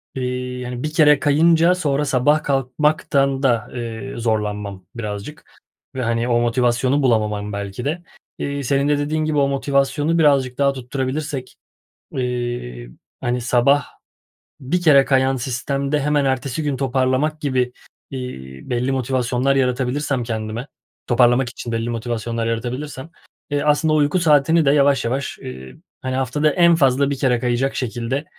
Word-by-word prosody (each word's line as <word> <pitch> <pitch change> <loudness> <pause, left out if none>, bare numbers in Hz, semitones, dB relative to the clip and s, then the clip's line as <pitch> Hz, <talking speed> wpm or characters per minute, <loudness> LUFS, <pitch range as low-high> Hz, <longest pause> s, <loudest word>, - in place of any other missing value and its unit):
iii, 125 0 -4
hani 125 0 -5
bir 155 0 -3
kere 150 -3 +5
kayınca 165 +4 +4
sonra 150 -5 0
sabah 145 +3 +2
kalkmaktan 140 0 +1
da, 120 -5 +1
eee, 120 +2 -6
zorlanmam 105 -4 -2
birazcık 105 +5 -7 0.4
ve, 130 - -2
hani, 115 0 0
o 120 -1 +2
motivasyonu 125 +3 +1
bulamamam 105 -4 0
belki 100 +3 -5
de. 165 +5 -2 0.4
İii, 140 0 -3
senin 140 +2 +1
de 145 - +3
dediğin 155 +2 -1
gibi 155 -1 -1
o 140 -1 +3
motivasyonu 140 +3 0
birazcık 135 -5 +3
daha 140 -1 +2
tutturabilirsek, 130 +1 -4 0.6
iii, 120 - -4 0.3
hani 120 0 -1
sabah 125 +3 +3 0.8
bir 160 +7 -1
kere 145 -5 +6
kayan 135 -1 +2
sistemde 135 +3 -2
hemen 145 0 +1
ertesi 135 +2 -1
gün 145 -3 -1
toparlamak 135 +3 0
gibi, 130 -4 0 0.4
iii, 65 - -8
belli 125 +2 0
motivasyonlar 130 +1 0
yaratabilirsem 130 +1 0
kendime, 110 +1 -4 0.4
toparlamak 120 +1 +3
için 120 -1 -7
belli 115 +1 -2
motivasyonlar 115 0 -3
yaratabilirsem, 130 +6 -4 0.4
eee, 145 0 0
aslında 150 +1 +2
uyku 150 +4 +2
saatini 160 0 +4
de 140 - +4
yavaş, 140 -2 +3
yavaş, 130 +4 -3
iii, 65 0 -9 0.3
hani 130 0 -2
haftada 135 +4 +1
en 170 +2 +5
fazla 140 -2 +3
1 140 - -2
kere 125 -3 +2
kayacak 125 +2 0
şekilde, 125 +3 -3
130 Hz, 140 wpm, -20 LUFS, 120-145 Hz, 0.8 s, kere